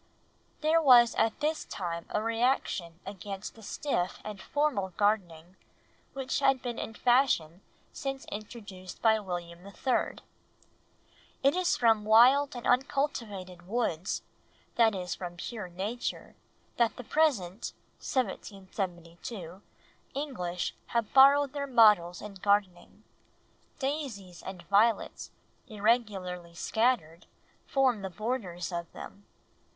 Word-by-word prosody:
There 315 Hz, +2 st, +4 dB
was 245 Hz, -5 st, +7 dB
at 225 Hz, +5 st, 0 dB
this 310 Hz, +1 st, 0 dB
time 170 Hz, -3 st, -5 dB
a 210 Hz, -, -1 dB
reaction 225 Hz, -7 st, 0 dB
against 195 Hz, 0 st, -7 dB
the 225 Hz, -, -15 dB
stiff 200 Hz, -5 st, -2 dB
and 210 Hz, -3 st, -7 dB
formal 290 Hz, -10 st, 0 dB
gardening 185 Hz, -4 st, 0 dB, 0.6 s
which 265 Hz, -1 st, -2 dB
had 270 Hz, -1 st, +3 dB
been 240 Hz, -2 st, -4 dB
in 225 Hz, -, -5 dB
fashion 240 Hz, -, +2 dB, 0.3 s
since 270 Hz, -1 st, -4 dB
introduced 205 Hz, -3 st, -8 dB
by 220 Hz, -1 st, +5 dB
William 175 Hz, -3 st, -6 dB
III. 200 Hz, +6 st, -1 dB, 1.3 s
"It 275 Hz, +3 st, +4 dB
is 365 Hz, -1 st, +2 dB
from 225 Hz, -3 st, +3 dB
wild 250 Hz, +6 st, +6 dB
and 240 Hz, -, -7 dB
uncultivated 215 Hz, -9 st, -1 dB
woods, 200 Hz, -5 st, -1 dB, 0.5 s
that 225 Hz, -3 st, +4 dB
is 180 Hz, -1 st, -3 dB
from 175 Hz, -1 st, -7 dB
pure 210 Hz, +1 st, -6 dB
nature, 200 Hz, +7 st, -4 dB, 0.4 s
that 235 Hz, -2 st, +2 dB
the 250 Hz, -, -8 dB
present 230 Hz, -, +1 dB, 0.3 s
(1772) 190 Hz, -, -4 dB, 0.5 s
English 180 Hz, -, -3 dB
have 235 Hz, -3 st, -1 dB
borrowed 275 Hz, +1 st, +7 dB
their 285 Hz, -1 st, -3 dB
models 210 Hz, -8 st, +5 dB
in 210 Hz, -1 st, -7 dB
gardening... 195 Hz, -2 st, 0 dB, 0.7 s
daisies 260 Hz, -, -4 dB
and 185 Hz, -2 st, -8 dB
violets 205 Hz, +4 st, +2 dB, 0.4 s
irregularly 200 Hz, -6 st, -1 dB
scattered 215 Hz, -6 st, 0 dB, 0.4 s
form 260 Hz, -6 st, +2 dB
the 190 Hz, -, -4 dB
borders 190 Hz, -5 st, -3 dB
of 170 Hz, -1 st, -4 dB
them. 200 Hz, 0 st, -11 dB
210 Hz, 115 wpm, -30 LUFS, 180-250 Hz, 1.3 s, was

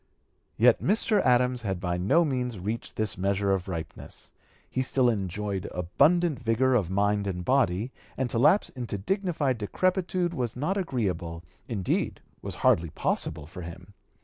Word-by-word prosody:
Yet 120 Hz, +1 st, +5 dB
Mr. 210 Hz, +1 st, +2 dB
Adams 125 Hz, 0 st, +3 dB
had 95 Hz, -5 st, -2 dB
by 90 Hz, -1 st, -1 dB
no 150 Hz, -, +3 dB
means 125 Hz, -5 st, -2 dB
reached 105 Hz, +5 st, -4 dB
this 110 Hz, -4 st, -1 dB
measure 100 Hz, +1 st, +1 dB
of 95 Hz, -1 st, -2 dB
ripeness; 85 Hz, -4 st, -7 dB, 0.4 s
he 130 Hz, -, -2 dB
still 130 Hz, -1 st, +2 dB
enjoyed 100 Hz, -1 st, -3 dB
abundant 150 Hz, -, +2 dB
vigor 125 Hz, +2 st, +2 dB
of 105 Hz, -9 st, +2 dB
mind 100 Hz, +1 st, +1 dB
and 90 Hz, -2 st, -3 dB
body, 120 Hz, -4 st, +2 dB, 0.3 s
and 130 Hz, -, 0 dB
to 115 Hz, -, 0 dB
lapse 165 Hz, -, +4 dB
into 120 Hz, -5 st, -5 dB
dignified 150 Hz, -, -1 dB
decrepitude 180 Hz, -, 0 dB
was 125 Hz, -7 st, -2 dB
not 150 Hz, +10 st, -1 dB
agreeable, 95 Hz, -, -2 dB, 0.2 s
indeed 100 Hz, -6 st, -1 dB, 0.2 s
was -, -, -5 dB
hardly 85 Hz, 0 st, +4 dB
possible 75 Hz, -1 st, -2 dB
for 90 Hz, +4 st, -9 dB
him. 90 Hz, +3 st, -10 dB
115 Hz, 150 wpm, -27 LUFS, 95-135 Hz, 0.4 s, Yet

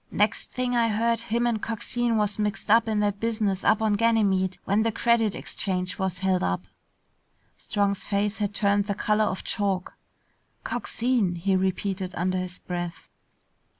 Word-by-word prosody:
Next 210 Hz, +1 st, 0 dB
thing 250 Hz, -1 st, -1 dB
I 235 Hz, -1 st, +3 dB
heard, 230 Hz, +2 st, +1 dB
him 235 Hz, +1 st, -1 dB
and 230 Hz, -3 st, 0 dB
Coxine 235 Hz, +1 st, -1 dB
was 210 Hz, -1 st, 0 dB
mixed 210 Hz, 0 st, -1 dB
up 230 Hz, +1 st, +5 dB
in 215 Hz, -1 st, +1 dB
that 205 Hz, -1 st, 0 dB
business 215 Hz, -4 st, -1 dB
up 220 Hz, +1 st, +3 dB
on 215 Hz, -1 st, +2 dB
Ganymede 200 Hz, -4 st, +2 dB
when 200 Hz, +3 st, +2 dB
the 225 Hz, +1 st, +1 dB
Credit 225 Hz, -2 st, +2 dB
Exchange 185 Hz, -2 st, -3 dB
was 190 Hz, -2 st, -1 dB
held 185 Hz, 0 st, +1 dB
up." 90 Hz, 0 st, -1 dB, 0.9 s
Strong's 200 Hz, -2 st, -1 dB
face 205 Hz, +1 st, -1 dB
had 205 Hz, -1 st, 0 dB
turned 200 Hz, -1 st, +2 dB
the 200 Hz, -, -1 dB
color 215 Hz, +1 st, +2 dB
of 190 Hz, -, -3 dB
chalk. 195 Hz, -3 st, -1 dB, 0.7 s
"Coxine!" 230 Hz, -7 st, 0 dB
he 190 Hz, +3 st, +1 dB
repeated 190 Hz, 0 st, -1 dB
under 185 Hz, +1 st, 0 dB
his 180 Hz, 0 st, -5 dB
breath. 175 Hz, -1 st, -6 dB
205 Hz, 160 wpm, -26 LUFS, 190-225 Hz, 0.9 s, up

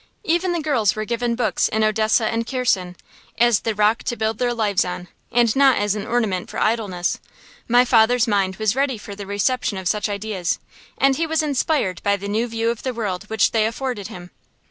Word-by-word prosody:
Even 345 Hz, +1 st, +1 dB
the 345 Hz, -, -1 dB
girls 240 Hz, -10 st, +1 dB
were 215 Hz, 0 st, -3 dB
given 235 Hz, +1 st, -1 dB
books 245 Hz, -, +1 dB
in 220 Hz, 0 st, 0 dB
Odessa 215 Hz, +1 st, +2 dB
and 230 Hz, +1 st, -1 dB
Kherson, 195 Hz, -9 st, 0 dB, 0.4 s
as 240 Hz, -3 st, +4 dB
the 225 Hz, -2 st, -2 dB
rock 210 Hz, +2 st, +2 dB
to 240 Hz, -, -1 dB
build 220 Hz, -1 st, -2 dB
their 245 Hz, -1 st, +1 dB
lives 215 Hz, -5 st, +1 dB
on, 180 Hz, 0 st, -6 dB, 0.2 s
and 235 Hz, -2 st, +3 dB
not 270 Hz, -2 st, +5 dB
as 205 Hz, -1 st, +1 dB
an 210 Hz, -1 st, -5 dB
ornament 215 Hz, -7 st, -1 dB
for -, -, -7 dB
idleness. 205 Hz, -6 st, 0 dB, 0.5 s
My 245 Hz, +1 st, +5 dB
father's 240 Hz, 0 st, +4 dB
mind 195 Hz, -3 st, +1 dB
was 215 Hz, +1 st, 0 dB
ready 270 Hz, -2 st, 0 dB
for 205 Hz, 0 st, -9 dB
the 200 Hz, 0 st, -8 dB
reception 205 Hz, +2 st, 0 dB
of 190 Hz, -1 st, -4 dB
such 210 Hz, +3 st, 0 dB
ideas, 200 Hz, -3 st, -2 dB, 0.4 s
and 270 Hz, -1 st, +3 dB
he 330 Hz, -, 0 dB
was 320 Hz, 0 st, +1 dB
inspired 280 Hz, -, 0 dB
by 200 Hz, 0 st, +1 dB
the 200 Hz, +1 st, -7 dB
new 220 Hz, +4 st, 0 dB
view 230 Hz, 0 st, -1 dB
of 235 Hz, -, -6 dB
the 255 Hz, -2 st, -3 dB
world 205 Hz, -4 st, -3 dB
which 220 Hz, -1 st, +1 dB
they 220 Hz, -1 st, +2 dB
afforded 235 Hz, -3 st, -4 dB
him. 175 Hz, 0 st, -10 dB
220 Hz, 210 wpm, -21 LUFS, 205-245 Hz, 0.5 s, not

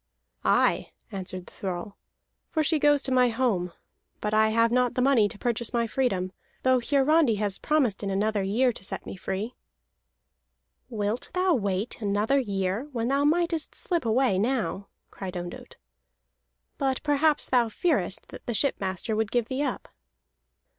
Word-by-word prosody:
"Aye," -, -, +2 dB, 0.2 s
answered 185 Hz, -2 st, -6 dB
the -, -, -15 dB
thrall, 190 Hz, +1 st, -5 dB, 0.5 s
"for 315 Hz, -, +1 dB
she 310 Hz, +1 st, +2 dB
goes 290 Hz, -1 st, +4 dB
to 265 Hz, -, -2 dB
my 250 Hz, -1 st, +4 dB
home. 225 Hz, -7 st, 0 dB, 0.5 s
But 210 Hz, 0 st, -2 dB
I 220 Hz, 0 st, +4 dB
have 230 Hz, +1 st, +3 dB
not 250 Hz, 0 st, +2 dB
the 255 Hz, -, +1 dB
money 245 Hz, -6 st, +4 dB
to 215 Hz, -, -9 dB
purchase 235 Hz, 0 st, 0 dB
my 235 Hz, 0 st, +2 dB
freedom, 210 Hz, -6 st, -1 dB, 0.3 s
though 260 Hz, -1 st, +4 dB
Hiarandi 280 Hz, 0 st, +3 dB
has 205 Hz, -2 st, -2 dB
promised 275 Hz, -10 st, +1 dB
in 200 Hz, -, -2 dB
another 205 Hz, +2 st, 0 dB
year 225 Hz, +7 st, +2 dB
to 195 Hz, -, -10 dB
set -, -, -5 dB
me -, -, -6 dB
free." 195 Hz, +5 st, -4 dB, 1.4 s
"Wilt 215 Hz, 0 st, -2 dB
thou 365 Hz, 0 st, +3 dB
wait 205 Hz, -2 st, -1 dB
another 210 Hz, +6 st, +2 dB
year 200 Hz, +2 st, -2 dB
when 235 Hz, -2 st, -1 dB
thou 280 Hz, +1 st, +2 dB
mightest 330 Hz, +1 st, +1 dB
slip 345 Hz, -3 st, -1 dB
away 230 Hz, -3 st, +2 dB
now?" 220 Hz, -3 st, -1 dB, 0.2 s
cried 185 Hz, -2 st, -6 dB
Ondott. 175 Hz, 0 st, -8 dB, 1.0 s
"But 270 Hz, -2 st, 0 dB
perhaps 295 Hz, +1 st, +2 dB
thou 240 Hz, -3 st, +3 dB
fearest 215 Hz, -, 0 dB
that -, -, -11 dB
the 240 Hz, -, -1 dB
shipmaster 200 Hz, -4 st, -1 dB
would 220 Hz, -1 st, 0 dB
give 240 Hz, -2 st, 0 dB
thee 260 Hz, +1 st, -1 dB
up." 290 Hz, -, -2 dB
230 Hz, 160 wpm, -27 LUFS, 200-270 Hz, 1.4 s, goes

